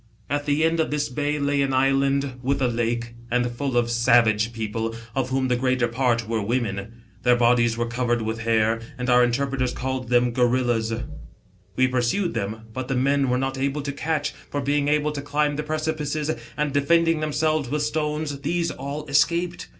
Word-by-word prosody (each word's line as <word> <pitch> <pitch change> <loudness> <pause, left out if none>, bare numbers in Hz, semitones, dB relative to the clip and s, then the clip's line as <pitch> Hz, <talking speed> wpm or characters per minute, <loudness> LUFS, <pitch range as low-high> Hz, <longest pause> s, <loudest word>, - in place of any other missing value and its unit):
"At 145 0 -1
the 145 +2 +2
end 165 +1 +2
of 160 - +1
this 150 0 -1
bay 145 +3 -1
lay 140 -1 +1
an 135 -1 0
island 135 0 +1
with 135 +3 0
a 130 - +2
lake, 120 0 -2 0.2
and 125 +1 +1
full 125 +1 -2
of 120 -1 +2
savage 115 -2 +3
people, 115 0 -3 0.2
of 130 0 -1
whom 130 0 0
the 125 - +2
greater 130 -1 +1
part 120 -2 0
were 115 -1 -1
women. 115 0 -3 0.2
Their 125 -1 +4
bodies 120 -1 +3
were 120 - 0
covered 120 0 -1
with 110 +1 -3
hair, 110 0 +2 0.2
and 125 0 -1
our 125 0 +6
interpreters 130 +1 0
called 130 -1 -3
them 125 0 +3
Gorillas. 120 -2 +1 0.8
We 130 +2 +4
pursued 130 +9 0
them; 105 +3 -3
but 130 +1 -4
the 135 - -1
men 140 +2 +2
we 125 - 0
were - - +2
not 135 0 -2
able 140 +2 -1
to 140 - -2
catch, 150 +1 -2 0.2
for 145 - -2
being 145 +1 0
able 150 0 +2
to 145 -1 -4
climb 145 +1 0
the 150 - -2
precipices, 155 0 -2 0.3
and 150 -2 -1
defending 165 +3 +3
themselves 155 -2 0
with 150 +2 -1
"stones, 150 -1 -2
these 170 +3 0
all 140 +3 -5
escaped. 170 +4 +1
130 Hz, 190 wpm, -24 LUFS, 120-145 Hz, 0.8 s, our